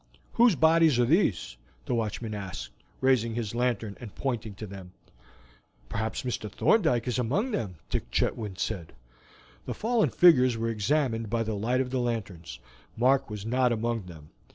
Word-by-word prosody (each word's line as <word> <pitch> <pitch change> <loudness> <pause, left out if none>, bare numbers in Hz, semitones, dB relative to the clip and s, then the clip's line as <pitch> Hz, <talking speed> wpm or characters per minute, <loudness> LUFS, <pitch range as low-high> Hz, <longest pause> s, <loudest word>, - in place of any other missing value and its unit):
"Whose 235 -5 +5
bodies 160 -3 +4
are 120 - +4
these?" 90 - +1 0.3
the - - -2
watchman 110 -1 -2
asked, 95 -12 -6 0.3
raising 120 -4 +2
his 115 -3 -3
lantern 115 -4 -1
and 115 -5 -10
pointing 115 -6 -3
to 110 - -7
them. 95 -2 -10 1.0
"Perhaps 110 +2 -3
Mr. 120 -4 -3
Thorndyke 130 - +2
is 125 0 0
among 170 - 0
them," 105 - -3
Dick - - -3
Chetwynd 100 - -1
said. 90 -3 -4 0.7
The - - -3
fallen 230 0 +1
figures 130 -9 +5
were 115 +1 -1
examined 115 0 0
by 115 +1 0
the 110 0 -3
light 120 +5 0
of 125 -1 -4
the 130 - 0
lanterns. 110 -8 -4 0.4
Mark 135 +2 +3
was 105 -1 -6
not 125 +2 +2
among 115 -3 -2
them. 80 -3 -12
115 Hz, 160 wpm, -28 LUFS, 105-130 Hz, 1.0 s, Whose